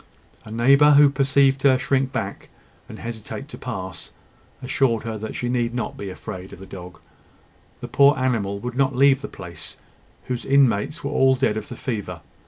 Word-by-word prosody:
A -, -, -11 dB
neighbour 140 Hz, +6 st, +5 dB
who 145 Hz, 0 st, +7 dB
perceived 135 Hz, 0 st, +2 dB
her 130 Hz, -2 st, +5 dB
shrink 130 Hz, 0 st, 0 dB
back, -, -, -5 dB, 0.4 s
and -, -, -9 dB
hesitate 115 Hz, +4 st, -7 dB
to -, -, -9 dB
pass, 95 Hz, -8 st, -6 dB, 0.5 s
assured 130 Hz, -3 st, +1 dB
her 115 Hz, -1 st, -4 dB
that 110 Hz, +1 st, -6 dB
she 120 Hz, -, -3 dB
need 120 Hz, -1 st, -1 dB
not 120 Hz, -, -3 dB
be 100 Hz, -, -6 dB
afraid 95 Hz, 0 st, -8 dB
of -, -, -10 dB
the 95 Hz, -, -11 dB
dog. 90 Hz, -3 st, -10 dB, 0.8 s
The -, -, -5 dB
poor 140 Hz, 0 st, +4 dB
animal 115 Hz, -7 st, -1 dB
would 125 Hz, 0 st, -4 dB
not 135 Hz, 0 st, +1 dB
leave 135 Hz, +1 st, +4 dB
the 140 Hz, -, -5 dB
place, 85 Hz, -2 st, -9 dB, 0.5 s
whose 125 Hz, -1 st, -3 dB
inmates 135 Hz, -1 st, +2 dB
were 140 Hz, -, -3 dB
all 135 Hz, -2 st, +4 dB
dead 105 Hz, -, +1 dB
of 110 Hz, -1 st, -5 dB
the -, -, -8 dB
fever. 100 Hz, -, -5 dB
125 Hz, 185 wpm, -23 LUFS, 105-135 Hz, 0.8 s, who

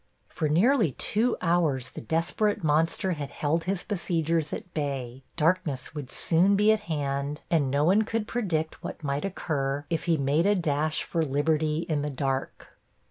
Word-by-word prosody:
For 155 Hz, -, -2 dB
nearly 200 Hz, -, +3 dB
two 230 Hz, -, +1 dB
hours 155 Hz, -7 st, +1 dB
the -, -, -8 dB
desperate 170 Hz, -, 0 dB
monster 160 Hz, +5 st, +1 dB
had 145 Hz, -5 st, -4 dB
held 160 Hz, +3 st, -1 dB
his 190 Hz, 0 st, -1 dB
besiegers 165 Hz, -4 st, 0 dB
at 180 Hz, -, -6 dB
bay, 135 Hz, -4 st, -3 dB
darkness 160 Hz, -5 st, 0 dB
would 145 Hz, -4 st, -6 dB
soon 180 Hz, +4 st, +3 dB
be 210 Hz, +2 st, +5 dB
at 220 Hz, -, +2 dB
hand 140 Hz, -1 st, -2 dB
and 150 Hz, -5 st, +3 dB
no 140 Hz, +2 st, +2 dB
one 190 Hz, +7 st, +4 dB
could 220 Hz, 0 st, -2 dB
predict 170 Hz, -10 st, -2 dB
what -, -, -6 dB
might 140 Hz, +3 st, -1 dB
occur 145 Hz, -6 st, -2 dB
if 165 Hz, -, -1 dB
he 170 Hz, -2 st, +2 dB
made 145 Hz, +6 st, +2 dB
a 205 Hz, -, +4 dB
dash 155 Hz, -3 st, 0 dB
for 165 Hz, -, -1 dB
liberty 155 Hz, +2 st, 0 dB
in 155 Hz, -3 st, 0 dB
the 150 Hz, -, -2 dB
dark. 135 Hz, -1 st, -3 dB
160 Hz, 170 wpm, -27 LUFS, 145-180 Hz, -, be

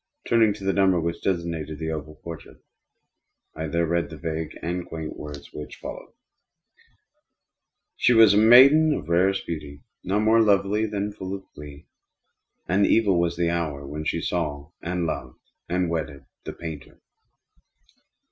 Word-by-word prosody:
Turning 115 Hz, -2 st, +4 dB
to 100 Hz, -1 st, -7 dB
the 95 Hz, 0 st, +1 dB
number 95 Hz, -3 st, +3 dB
which 85 Hz, +1 st, -3 dB
designated 85 Hz, -4 st, -2 dB
the 80 Hz, +1 st, -3 dB
oval 75 Hz, 0 st, -6 dB
portrait, 85 Hz, -2 st, -9 dB, 1.0 s
I 80 Hz, 0 st, -4 dB
there 85 Hz, +2 st, 0 dB
read 85 Hz, -2 st, -1 dB
the -, -, -9 dB
vague 80 Hz, -1 st, -4 dB
and 90 Hz, +1 st, -2 dB
quaint 80 Hz, -2 st, -7 dB
words 75 Hz, -1 st, -9 dB
which 75 Hz, -, -8 dB
follow: -, -, -9 dB, 1.8 s
"She -, -, +3 dB
was 115 Hz, -3 st, +7 dB
a -, -, +3 dB
maiden 140 Hz, +8 st, +7 dB
of 80 Hz, -2 st, -6 dB
rarest 95 Hz, +3 st, +2 dB
beauty, 75 Hz, -3 st, -7 dB, 0.2 s
and -, -, -10 dB
not 100 Hz, +2 st, +2 dB
more 110 Hz, +1 st, +5 dB
lovely 105 Hz, +1 st, +2 dB
than 105 Hz, 0 st, -3 dB
full 95 Hz, -2 st, -5 dB
of 95 Hz, -, -10 dB
glee. 75 Hz, 0 st, -11 dB, 0.8 s
And 100 Hz, +3 st, +3 dB
evil 100 Hz, -6 st, +3 dB
was 85 Hz, 0 st, 0 dB
the 85 Hz, -1 st, +1 dB
hour 75 Hz, -5 st, -3 dB
when 75 Hz, +2 st, -6 dB
she 85 Hz, +2 st, -1 dB
saw, 75 Hz, -3 st, -3 dB
and 90 Hz, 0 st, -2 dB
loved, 65 Hz, -6 st, -5 dB, 0.3 s
and 90 Hz, 0 st, 0 dB
wedded 80 Hz, -4 st, -4 dB, 0.2 s
the -, -, -5 dB
painter. 80 Hz, -5 st, -9 dB
85 Hz, 155 wpm, -24 LUFS, 80-100 Hz, 1.8 s, was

